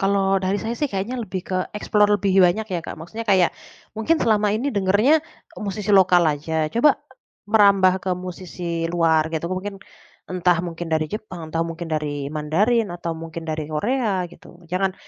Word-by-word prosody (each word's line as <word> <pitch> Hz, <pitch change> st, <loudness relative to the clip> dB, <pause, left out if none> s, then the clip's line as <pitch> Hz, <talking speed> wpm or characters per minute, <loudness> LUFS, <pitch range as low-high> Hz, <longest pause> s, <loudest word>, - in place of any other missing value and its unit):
Kalau 195 Hz, -1 st, +2 dB
dari 190 Hz, +1 st, 0 dB
saya 225 Hz, +1 st, -2 dB
sih 295 Hz, -, 0 dB
kayaknya 215 Hz, +4 st, -3 dB
lebih 185 Hz, -4 st, -4 dB
ke 185 Hz, -, -2 dB, 0.2 s
explore 210 Hz, 0 st, +2 dB
lebih 200 Hz, -2 st, 0 dB
banyak 185 Hz, +4 st, +3 dB
ya 175 Hz, -, -1 dB
Kak, -, -, -8 dB
maksudnya 220 Hz, +8 st, -7 dB
kayak, 185 Hz, -3 st, +4 dB, 0.4 s
mungkin 225 Hz, +10 st, +2 dB
selama 215 Hz, -2 st, +3 dB
ini 270 Hz, +5 st, -2 dB
dengernya, 205 Hz, +10 st, +3 dB, 0.4 s
musisi 210 Hz, 0 st, -2 dB
lokal 185 Hz, -3 st, +6 dB
aja 155 Hz, +1 st, -2 dB
coba, 245 Hz, +6 st, +4 dB, 0.5 s
merambah 200 Hz, -3 st, +5 dB
ke 190 Hz, -, -1 dB
musisi 175 Hz, -2 st, -4 dB
luar 160 Hz, -2 st, +3 dB
gitu 160 Hz, 0 st, -2 dB
mungkin, 195 Hz, +2 st, -4 dB, 0.5 s
entah 180 Hz, -1 st, +2 dB
mungkin 175 Hz, 0 st, -5 dB
dari 155 Hz, 0 st, +2 dB
Jepang 180 Hz, -7 st, -7 dB
atau 165 Hz, -, +1 dB
mungkin 165 Hz, 0 st, -6 dB
dari 145 Hz, -2 st, -2 dB
Mandarin 200 Hz, +10 st, +1 dB
atau 170 Hz, -1 st, -4 dB
mungkin 165 Hz, 0 st, -7 dB
dari 155 Hz, -1 st, -3 dB
Korea 200 Hz, -, 0 dB
gitu 175 Hz, +1 st, -16 dB
jangan 185 Hz, +1 st, 0 dB
185 Hz, 165 wpm, -22 LUFS, 165-210 Hz, 0.5 s, lokal